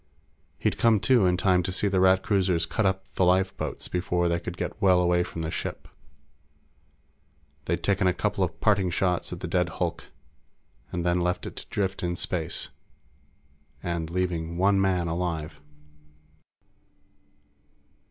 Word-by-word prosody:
He'd - - -1
come 115 -2 +4
to 110 -3 +4
in 90 0 +2
time 90 -1 +3
to 95 +2 -3
see 100 +2 0
the 95 -2 +1
Rat 95 0 +4
cruisers 90 -5 +2
cut 100 +5 0
up 95 0 -1
the - - +1
lifeboats 95 +1 0
before 90 -1 0
they 85 0 +1
could 90 +1 -7
get 90 +4 -5
well 95 -3 +5
away 90 0 +3
from 85 -1 -4
the 80 - -3
ship. - - -5 1.8
They'd - - -1
taken 100 -1 +2
a - - +5
couple - - 0
of - - -3
parting 100 -3 +3
shots 90 0 0
at 90 - -6
the 90 - -3
dead 90 0 +1
hulk, - - -2 0.9
and 90 -1 -3
then 90 0 +2
left 90 +1 -1
it - - -7
to - - -8
drift 95 -1 -2
in 85 0 -1
space 85 -2 -2 1.1
and 85 -2 -2
leaving 85 -2 -2
one 95 +1 +3
man 90 -3 +1
alive. 80 -3 -3
90 Hz, 155 wpm, -26 LUFS, 85-95 Hz, 1.8 s, well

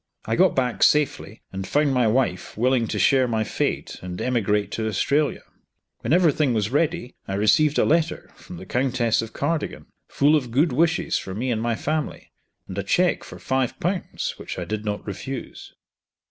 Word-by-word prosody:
I 115 - 0
got 185 +5 +4
back 125 -3 0
safely, 140 -7 +2
and 95 0 -4
found 145 -1 +2
my 125 -3 +3
wife 110 -7 0
willing 120 0 +2
to 105 - -3
share 130 +6 +4
my 110 -2 0
fate - - -2
and 90 -1 -6
to - - -3
emigrate 105 -5 0
to 110 -1 -2
Australia. 140 +8 0 0.6
When 115 - -4
every 170 -1 +5
thing 140 -4 +1
was 105 0 0
ready 160 -2 0
I 95 - -2
received 140 +9 +3
a - - +4
letter 165 0 0
from 90 - -11
the 95 - -9
Countess 125 -2 +1
of 115 0 -7
Cardigan, 155 +2 -2 0.2
full 145 +2 +3
of 130 -5 0
good 140 +5 +2
wishes 165 +5 +1
for 95 - -7
me 125 +4 -1
and 110 -2 -1
my 115 0 0
family, 155 +4 -3 0.4
and 95 - -7
a - - -2
cheque 175 - +2
for - - -10
Ł5 135 - -2
which - - -6
I - - -3
did 105 0 -4
not 105 -1 -3
refuse. 120 +6 -7
125 Hz, 190 wpm, -24 LUFS, 110-150 Hz, 0.6 s, every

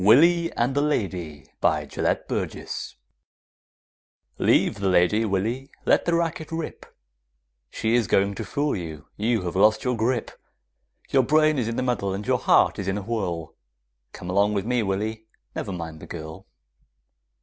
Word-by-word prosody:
WILLY 165 - +5
AND 120 +3 0
THE 145 - +2
LADY 90 - -2
BY - - +2
GELETT - - -1
BURGESS - - -4 1.4
Leave - - +3
the 100 -1 +1
lady, 95 +5 +3
Willy, 110 +7 -1 0.2
let - - +3
the 170 - +2
racket 165 -2 -2
rip, 165 -1 -5 0.8
She 110 +1 -1
is 120 -4 +3
going 100 +2 +2
to - - -5
fool 145 +1 -1
you, 80 -5 -6
you 110 -1 0
have 90 0 -4
lost 105 +3 +4
your 125 -1 0
grip, 115 +2 0 0.8
Your 135 - +5
brain 155 +2 +3
is 115 - -1
in 115 - -3
a 130 - 0
muddle 100 -6 -1
and 100 +2 -5
your - - +2
heart - - +4
is 95 - -4
in 95 +1 0
a 100 - -4
whirl, 90 -8 -3 0.6
Come 90 - -9
along 100 +2 +3
with 100 0 -1
me, 125 0 +1
Willy, 110 +2 -2 0.3
never - - -3
mind 80 -3 -6
the - - -11
girl! 80 -1 -8
110 Hz, 165 wpm, -25 LUFS, 95-125 Hz, 1.4 s, WILLY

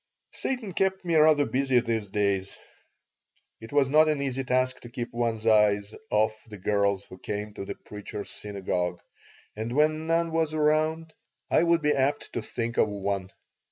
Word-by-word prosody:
Satan 240 -8 -3
kept 190 +1 0
me 170 - 0
rather 155 -2 +5
busy 135 -2 +2
these 115 -3 -2
days. 100 -1 -1 1.0
It 115 - -11
was 145 -2 +3
not 155 +3 +5
an 150 -2 +1
easy 135 -1 -2
task 130 0 +1
to 120 - -11
keep 120 -1 -5
one's 115 -2 -1
eyes 105 -2 +3 0.2
off 110 +1 +1
the 105 - -8
girls 100 0 +1
who 95 - -13
came 105 +2 -4
to 100 - -6
the - - -5
Preacher's 105 0 -7
Synagogue, 90 -3 -3 0.6
and 110 +3 -4
when 155 +1 +2
none 165 0 +1
was 160 -1 0
around 155 +1 +1 0.4
I - - +5
would 170 -1 +3
be 150 0 +4
apt 140 +2 0
to 120 - -2
think 115 +1 -4
of 110 - +4
one. 100 -2 -3
120 Hz, 170 wpm, -27 LUFS, 105-155 Hz, 1.0 s, rather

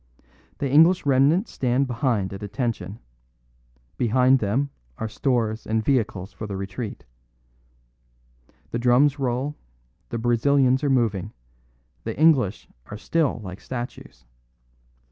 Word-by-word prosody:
The 140 - -1
English 160 +6 +5
remnant 140 - +3
stand 130 +2 0
behind 120 -6 -1
at 95 - -8
attention; 105 -2 -3 1.0
beside 125 +3 +3
them 125 +7 0 0.3
are 110 - -3
stores 115 -2 -1
and 110 0 0
vehicles 110 -8 0
for 110 - -7
the 100 -2 -5
retreat. 100 -2 -6 1.7
The 120 - -2
drums 130 +4 +3
roll; 130 +3 -1 0.5
the 115 - -3
Brazilians 130 +3 +2
are 145 - +2
moving; 115 -8 0 0.7
the - - -5
English 140 - +3 0.2
are 105 - -7
still 150 +1 0
like 90 -1 -8
statues. 120 - -7
125 Hz, 115 wpm, -24 LUFS, 110-135 Hz, 1.7 s, English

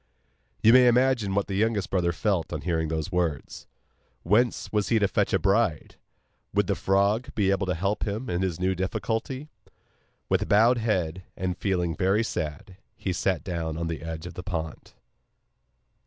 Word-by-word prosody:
You 115 - +7
may 125 -1 +7
imagine 120 -5 +3
what 100 - +1
the 100 - -5
youngest 105 -1 0
brother 90 -2 +1
felt 90 -1 -1
on - - -3
hearing 80 -2 -1
these 80 +3 -3
words. 85 -5 -2 0.6
Whence 115 +7 +1
was 105 -3 0
he 115 - +3
to 105 -2 +3
fetch - - 0
a - - +4
bride? 100 -5 0 0.6
Would - - +3
the - - 0
frog 100 +5 +1
be 100 -3 +2
able 95 -1 0
to 90 - 0
help 100 +5 -1
him 110 +5 -3
in 90 +1 -1
this 90 -3 -2
new 95 +1 +1
difficulty? 110 - -3 0.8
With - - 0
bowed 115 +4 +5
head, 95 -6 -1 0.2
and 90 -1 -2
feeling 90 -4 -1
very 95 +7 +2
sad, 85 -1 -5 0.2
he 95 - -2
sat 90 -3 0
down 80 -3 -3
on 85 - -2
the 80 -1 -4
edge 80 0 -6
of 90 - -7
the - - -6
pond. 80 -4 -5
95 Hz, 175 wpm, -26 LUFS, 85-105 Hz, 0.8 s, You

